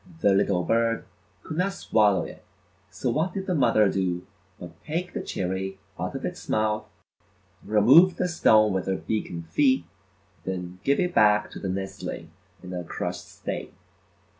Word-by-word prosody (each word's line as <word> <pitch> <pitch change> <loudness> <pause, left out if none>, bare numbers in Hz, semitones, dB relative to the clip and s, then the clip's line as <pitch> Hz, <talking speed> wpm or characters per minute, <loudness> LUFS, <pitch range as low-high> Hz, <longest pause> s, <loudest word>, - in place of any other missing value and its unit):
The 100 - +5
little 95 -2 +2
bird 115 +2 +1 0.4
could 155 - -6
not 195 +2 +1
swallow 105 - +2
it, - - -10 0.5
so 120 +6 -2
what 165 +8 0
did 190 -1 -3
the 185 - -1
mother 115 - +4
do 90 -2 -1 0.3
but 85 -1 -11
take 175 +4 -3
the - - -3
cherry 95 +1 -3 0.2
out - - -3
of - - -4
its - - -6
mouth, 110 0 +1 0.8
remove 130 - +6
the 180 - 0
stone 110 - +4
with 95 -1 -2
her 95 - +1
beak 110 +2 -3
and 85 -1 -7
feet, 130 - +2 0.6
and 95 - -2
then 90 0 -7
give 140 +1 +2
it 180 -1 0
back 105 -1 +4
to - - -8
the 95 - -4
nestling 95 -3 -5 0.3
in 90 0 -7
a 90 -1 -3
crushed - - -5
state. - - -6
105 Hz, 170 wpm, -26 LUFS, 95-135 Hz, 0.8 s, remove